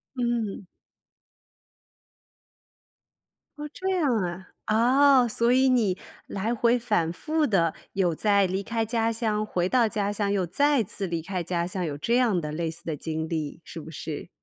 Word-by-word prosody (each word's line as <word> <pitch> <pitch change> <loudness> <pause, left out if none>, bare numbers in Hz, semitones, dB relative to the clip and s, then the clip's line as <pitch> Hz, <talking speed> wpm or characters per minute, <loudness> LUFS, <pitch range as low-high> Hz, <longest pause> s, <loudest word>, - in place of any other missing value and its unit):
嗯。 235 -6 -2 2.9
哦， 300 0 -5
这 380 +1 -3
样 315 -10 +2
啊。 180 -1 -4 0.7
哦， 245 - +1
所 235 +2 +1
以 260 +1 +4
你 215 -7 +2 0.3
来 215 +4 -2
回 235 +1 +3
反 210 -9 0
复 305 - 0
地 170 -6 +2 0.2
有 185 -4 +1
在 200 +3 +3
离 190 +1 -1
开 225 +2 -2
家 225 0 0
乡 220 -2 -1
回 180 -4 -1
到 240 +1 +3
家 205 -2 -1
乡 205 -1 -1
又 195 -3 +1
再 285 - +2
次 195 0 -4
离 170 -2 -3
开 185 0 -3
家 170 0 -1
乡， 180 0 -3
有 145 -3 -3
这 235 +10 +1
样 230 -8 +3
的 150 -2 -4
类 165 +1 -2
似 165 +1 -6
的 160 - -2
经 160 +2 -4
历， 160 0 -4
是 165 - -8
不 155 - -10
是？ 155 0 -6
200 Hz, 180 characters per minute, -26 LUFS, 170-235 Hz, 2.9 s, 以